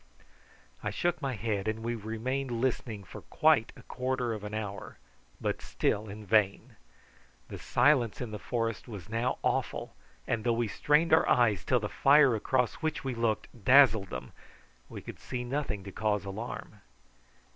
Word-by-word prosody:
I - - -2
shook 175 -2 -1
my 135 -3 -2
head, 105 -1 -2
and 110 +1 -2
we 120 +1 -1
remained 120 +5 -3
listening 115 -4 -2
for - - -10
quite - - +3
a - - -14
quarter 125 -2 -2
of 105 -2 -6
an 105 +1 -5
hour, 105 -2 -5 0.4
but - - -2
still 105 +1 -1
in 105 +2 -8
vain. 100 -1 +1 0.7
The - - -7
silence 125 -4 +2
in 125 -3 -5
the 105 - -5
forest 115 0 -2
was 105 -4 -9
now 115 +3 -1
awful, - - -1 0.3
and 110 -2 -1
though 120 - +2
we 115 0 0
strained 150 +9 +2
our 160 - +5
eyes 110 -7 +3
till 125 - +2
the 105 - -3
fire 140 +1 +5
across 125 +2 +1
which 160 -1 -2
we 135 -2 -2
looked 115 -2 0 0.2
dazzled 110 -5 +6
them, 65 +1 -6 0.6
we - - -8
could - - -9
see 125 -1 -4
nothing 125 -6 -3
to 100 - -8
cause 105 0 -1
alarm. 105 +5 -7
115 Hz, 165 wpm, -30 LUFS, 105-130 Hz, 0.7 s, dazzled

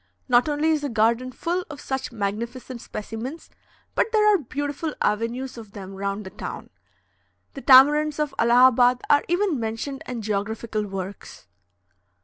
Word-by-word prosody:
Not 250 +3 +4
only 300 +2 +1
is 310 -2 +1
the 290 - -2
garden 230 +2 +1
full 345 +7 -2
of 295 -3 -8
such 265 -1 -4
magnificent 235 +4 -4
specimens, 225 +9 -7 0.4
but 450 - +1
there 425 -1 +5
are 395 - +3
beautiful 290 +3 -4
avenues 235 +4 -1
of 215 -3 -12
them 195 -2 -8
round 200 +1 -4
the 190 - -8
town. 210 - -7 0.8
The 275 - -8
tamarinds 290 +3 +6
of 300 -2 -1
Allahabad 245 +1 +5
are 290 0 +5
even 350 -4 +1
mentioned 230 +5 -4
in 240 -3 -5
geographical 215 +1 -2
works. 195 0 -7
250 Hz, 145 wpm, -24 LUFS, 220-290 Hz, 0.8 s, tamarinds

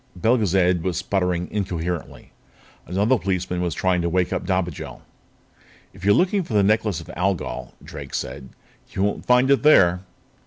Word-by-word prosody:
Belgezad 95 -6 +2
was 90 -1 -2
sputtering 90 -1 -1
incoherently. 90 -5 -4 0.6
Another 105 +7 +1
policeman 90 -1 -2
was 85 -3 -2
trying 90 -1 +1
to 85 - -1
wake 90 +1 0
up - - -3
Dobigel. 90 -5 -3 0.9
"If 95 0 -15
you're 100 +1 +4
looking 190 +3 +2
for 140 -11 -5
the 100 - +4
Necklace 105 -4 +1
of - - -13
Algol," 95 -1 -2
Drake - - -8
said, 65 - -5 0.4
"you 95 - -1
won't 105 - -2
find 125 +2 +4
it 140 - +4
there." 90 - +5
95 Hz, 155 wpm, -22 LUFS, 90-105 Hz, 0.9 s, there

